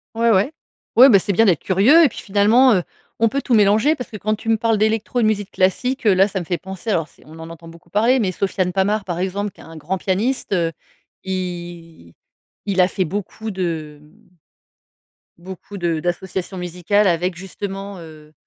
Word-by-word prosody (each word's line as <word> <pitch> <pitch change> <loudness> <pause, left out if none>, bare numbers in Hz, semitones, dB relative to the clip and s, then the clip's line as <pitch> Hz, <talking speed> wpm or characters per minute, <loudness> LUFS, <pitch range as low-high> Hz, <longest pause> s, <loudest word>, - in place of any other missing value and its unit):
Ouais, 230 +1 +2
ouais. 210 +5 +3 0.4
Ouais, 260 +4 +9
bah, 205 - +7
c'est 200 +1 -1
bien 225 +5 +4
d'être 175 -6 +2
curieux 225 - +5
et 290 - +5
puis - - -10
finalement, 215 +6 +4
heu, 180 - 0 0.3
on 230 - +3
peut 275 +5 -2
tout 250 - +1
mélanger 215 +9 +4
parce 250 -2 -8
que, 215 - -6
quand 215 +1 -1
tu 225 - -13
me 225 - +3
parles 225 0 +1
d'électro 220 +3 0
et - - +2
de - - +4
musique 205 -2 -1
classique, 250 +8 0
heu, 205 - +5
là, 190 +1 +4
ça 195 -1 -4
me 175 - -6
fait 175 0 -2
penser, 190 +3 -6
alors 165 -5 0
c'est - - -22
on 160 +2 -13
en 160 0 -9
entend 165 0 -12
beaucoup 165 +1 -15
parler, 230 +7 +2
mais 190 -4 0
Sofiane 185 -1 -2
Pamart, 200 +2 0
par 175 -2 -4
exemple, 195 +3 -2
qui - - -18
est - - -13
un 165 - -12
grand 160 +5 -3
pianiste, 205 +6 -1
heu, 170 -3 +1 0.5
i 175 - -6 0.5
il 195 -2 -1
a 180 - +4
fait 190 -1 -2
beaucoup 205 +5 -5
de, 160 -6 -4
mmh, 195 +9 -23 1.2
beaucoup 190 +2 -9
de 170 -3 -1
d'associations 185 +2 -4
musicales, 180 +4 0
avec 175 0 0
justement, 195 +1 -7
heu, 155 -2 -14
190 Hz, 210 wpm, -20 LUFS, 175-215 Hz, 1.2 s, Ouais